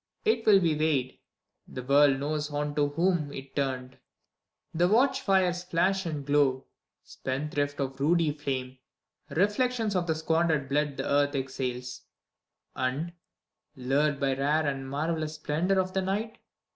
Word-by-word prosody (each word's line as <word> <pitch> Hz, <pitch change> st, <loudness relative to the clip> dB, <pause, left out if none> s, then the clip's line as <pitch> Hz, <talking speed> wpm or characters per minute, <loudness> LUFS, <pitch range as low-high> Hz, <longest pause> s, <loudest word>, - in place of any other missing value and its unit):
It 430 Hz, -, +1 dB
will 200 Hz, -2 st, +8 dB
be 165 Hz, -4 st, +1 dB
weighed: 150 Hz, -4 st, 0 dB, 0.5 s
the 130 Hz, -, -7 dB
world 140 Hz, +1 st, +4 dB
knows 150 Hz, +1 st, -2 dB
unto 145 Hz, 0 st, 0 dB
whom 170 Hz, -3 st, +1 dB
it 135 Hz, -1 st, -9 dB
turned. 130 Hz, -2 st, -3 dB, 0.7 s
The 175 Hz, +2 st, +3 dB
watch 265 Hz, +6 st, +3 dB
fires 185 Hz, -2 st, +2 dB
flash 185 Hz, +1 st, +1 dB
and 150 Hz, -4 st, -4 dB
glow, 140 Hz, -2 st, +2 dB, 0.4 s
spendthrift 145 Hz, +1 st, -3 dB
of 135 Hz, -1 st, -3 dB
ruddy 160 Hz, +2 st, +3 dB
flame; 130 Hz, -3 st, -4 dB, 0.5 s
Reflections 210 Hz, -, +1 dB
of 175 Hz, -1 st, 0 dB
the 160 Hz, -, +1 dB
squandered 160 Hz, -2 st, +1 dB
blood 145 Hz, 0 st, 0 dB
the -, -, -3 dB
earth 145 Hz, 0 st, +2 dB
exhales, 130 Hz, -2 st, -4 dB, 0.7 s
And, 140 Hz, +7 st, -2 dB, 0.6 s
lured 140 Hz, +3 st, +1 dB
by 135 Hz, -1 st, +1 dB
rare 150 Hz, +3 st, +1 dB
and 135 Hz, -2 st, -3 dB
marvellous 155 Hz, +2 st, -2 dB
splendor 165 Hz, +5 st, 0 dB
of 185 Hz, 0 st, -1 dB
the 190 Hz, -, +1 dB
night. 210 Hz, +4 st, -3 dB
150 Hz, 140 wpm, -28 LUFS, 135-175 Hz, 0.7 s, will